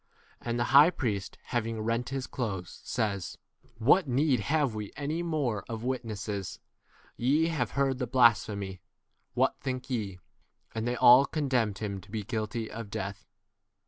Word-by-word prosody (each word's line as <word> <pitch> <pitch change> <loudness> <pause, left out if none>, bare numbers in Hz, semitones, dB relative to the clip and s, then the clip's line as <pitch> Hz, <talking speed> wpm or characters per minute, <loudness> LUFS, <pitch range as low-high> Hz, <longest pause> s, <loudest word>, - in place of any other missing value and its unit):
And 120 0 -2
the 120 - +1
high 145 +4 +9
priest, 105 - -3
having 115 -2 -2
rent 115 +3 -1
his 135 -1 -3
clothes, 100 -11 -5
says, 105 -6 -2 0.4
What 145 - +4
need 135 +1 +2
have 145 -5 +1
we 105 -1 -4
any 150 +3 -2
64 170 0 -3
more 130 -10 -1
of 115 -1 -5
witnesses? 110 -6 -3 0.6
Te 150 +7 +3
have 140 -8 -1
heard 135 -2 +1
the 125 - -1
blasphemy: 105 -6 +2 0.5
what - - +2
think 130 0 -4
ye? 105 -7 -2 0.6
And 110 +1 -2
they 120 - 0
all 125 +3 +7
condemned 125 -9 0
him 100 -2 -3
65 - - -9
to - - -18
be 110 -2 -2
guilty 110 +1 -3
of 115 -2 -7
death. 100 -2 -5
120 Hz, 160 wpm, -29 LUFS, 105-135 Hz, 0.6 s, high